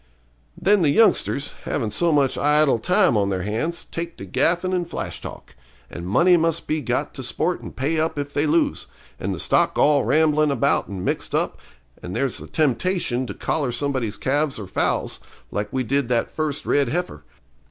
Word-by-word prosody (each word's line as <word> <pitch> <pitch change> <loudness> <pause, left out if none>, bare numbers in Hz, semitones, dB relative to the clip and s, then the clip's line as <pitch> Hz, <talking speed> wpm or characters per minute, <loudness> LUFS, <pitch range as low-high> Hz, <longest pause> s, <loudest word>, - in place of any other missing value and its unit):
Then 205 0 +3
the 155 - +3
youngsters, 145 -6 +3
havin' 115 -7 -2
so 170 +7 +2
much 140 -3 +2
idle 150 -3 +3
time 180 -2 +3
on 100 -2 +2
their 95 -2 -2
hands, 115 - -2
take 170 0 -6
to 95 - -8
gaffin' 175 - +1
and 175 -2 -1
flash - - -4
talk; - - -10 0.4
and 85 +1 -7
money 175 - +4
must 165 -1 0
be 155 0 -1
got 125 - -2
to - - -7
sport - - -1
and - - -9
pay 150 +5 -1
up 160 -1 -1
if 145 0 -4
they 145 +2 +1
lose; 150 - +1 0.3
and - - -2
the - - -3
stock - - +2
all 145 -2 +4
ramblin' 155 -1 +3
about 140 -4 +1
and 95 -2 -6
mixed - - -2
up, - - -1 0.4
and 90 +1 -6
there's 135 -3 -1
a - - -9
temptation 150 -3 0
to - - -6
collar 140 -6 -1
somebody's 120 -3 -1
calves 145 +2 0
or 105 - -6
foals, 95 - -1 0.3
like 105 0 -3
we 130 -1 -1
did 135 +1 0
that 120 -2 0
first 155 -2 -2
red 140 -4 +2
heifer. 160 - -3
145 Hz, 190 wpm, -22 LUFS, 120-160 Hz, 0.4 s, money